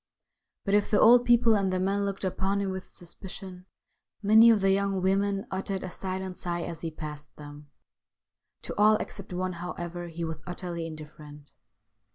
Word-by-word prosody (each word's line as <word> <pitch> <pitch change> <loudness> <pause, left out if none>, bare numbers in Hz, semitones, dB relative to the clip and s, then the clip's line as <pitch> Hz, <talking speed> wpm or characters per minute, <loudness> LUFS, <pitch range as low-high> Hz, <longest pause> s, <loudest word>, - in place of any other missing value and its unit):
But 200 - 0
if 205 0 +3
the 205 - +3
old 245 +2 +7
people 235 -2 +5
and 195 -2 +1
the 185 - 0
men 200 +2 0
looked 200 0 -4
upon 190 +1 0
him 195 -1 -1
with 190 0 -7
suspicion, 185 +1 -9 0.6
many 220 +3 +7
of 225 -2 +5
the 195 0 +3
young 195 0 +1
women 195 +1 +1
uttered 190 0 -3
a 185 - -5
silent 190 -1 -5
sigh 175 -1 -3
as 165 -2 -6
he 165 - -3
passed 150 -1 -8
them. 145 0 -11 0.9
To - - -5
all 215 +1 +6
except 195 -2 -6
one, 185 +1 -2
however, 175 0 -6
he 170 0 -5
was 160 -1 -5
utterly 175 -2 -4
indifferent. 150 -2 -11
185 Hz, 175 wpm, -28 LUFS, 170-200 Hz, 0.9 s, old